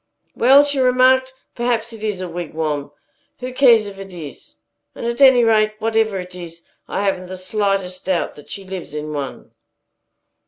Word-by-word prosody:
"Well," 270 +4 +6
she 285 -1 -1
remarked, 260 +1 +4 0.2
"perhaps 235 -1 -1
it 220 -1 -10
is 205 -4 -2
a 185 - -4
wigwam. 155 -4 -3 0.5
Who 255 0 -6
cares 240 -5 +5
if 200 -1 -9
it 195 0 -9
is? 160 -5 -10 0.4
And - - -6
at 235 +3 -2
any 260 -3 +7
rate, 215 -1 +3
whatever 220 -2 0
it 180 0 -8
is, 170 -2 -9 0.2
I 200 - -2
haven't 185 -2 -1
the 185 +1 -7
slightest 190 -1 -2
doubt 185 -2 -1
that 145 - -15
she 195 - -5
lives 185 -5 -7
in 150 0 -5
one." 140 -3 -6
200 Hz, 170 wpm, -20 LUFS, 180-235 Hz, 0.5 s, any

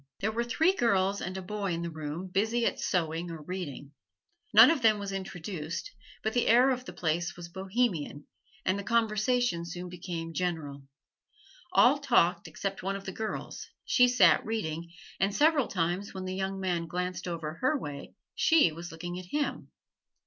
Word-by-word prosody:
There 215 - 0
were 235 +2 -1
three 320 +10 +2
girls 200 - +1
and 185 +1 -4
a 190 - -5
boy 200 -1 -2
in 170 0 -3
the 170 - -4
room, 155 +3 -5
busy 220 +6 +1
at - - 0
sewing 165 -1 -1
or 165 -2 -7
reading. 150 -5 -6 0.6
None - - +9
of 320 -5 0
them 220 -2 +5
was 200 -1 -4
introduced, 180 -4 -5 0.3
but 220 - -1
the 245 - +1
air 250 +4 +6
of 255 0 -2
the - - -7
place 170 +2 -1
was 175 -1 -8
Bohemian, 190 -6 -1 0.4
and 190 +2 +1
the - - -5
conversation 225 -3 +1
soon 175 +1 -6
became 170 -2 -5
general. 155 -6 -3 0.9
All 280 -3 +6
talked 235 -12 +2
except 195 +5 -4
one 195 +1 -2
of 195 0 -7
the 190 - -4
girls: 220 +3 -5 0.2
she 250 - +5
sat 195 -10 +5
reading, 170 -7 -3 0.3
and 195 +1 +1
several 295 -4 +4
times 180 +3 -2
when 190 0 -5
the 185 - -3
young 190 0 -2
man 175 -3 -1
glanced 180 +1 -3
over 165 -2 -4
her 260 +4 +2
way 145 - -7 0.2
she 320 - +4
was 170 +2 -8
looking 175 +2 -6
at 185 - -9
him. 290 +9 -2
185 Hz, 180 wpm, -29 LUFS, 170-220 Hz, 0.9 s, None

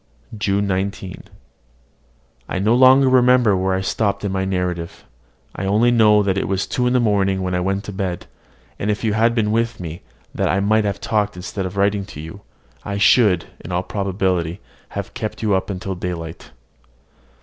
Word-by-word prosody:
JUNE 100 -1 0
19. 95 -1 -3 1.2
I - - -2
no 105 +5 +2
longer 130 +2 +6
remember 125 -4 +4
where 95 0 0
I 95 - -1
stopped 100 0 -1
in 100 - -1
my 95 0 -1
narrative: 90 -3 -3 0.5
I 95 - -4
only 110 +5 +3
know 105 -3 +4
it 95 0 0
was 95 0 -1
two 125 -3 -1
in 125 - +1
the 125 - +4
morning 100 -4 +1
when 90 0 -2
I 90 - +1
went 95 +2 -1
to 105 - -7
bed; 95 -3 -3 0.5
and 105 - -2
if 105 +1 -1
you 110 -2 +1
had 115 +2 +2
been 105 -3 +1
with 115 +1 0
me, 85 -1 -7 0.3
that - - 0
I 95 - +2
might 110 +2 +2
have 100 -1 -2
talked 105 -2 0
instead 95 +1 -4
of 95 +2 -9
writing 100 0 +1
to 85 - -11
you, 80 +6 -9 0.4
I 100 0 -4
should, 100 -4 +4
in 90 - -9
all 90 +1 0
probability, 95 -3 -1 0.4
have - - -5
kept 110 +1 -5
you 105 -2 +2
up 95 - 0
till 95 +1 -4
daylight. 85 -2 -6
100 Hz, 185 wpm, -20 LUFS, 95-110 Hz, 1.2 s, longer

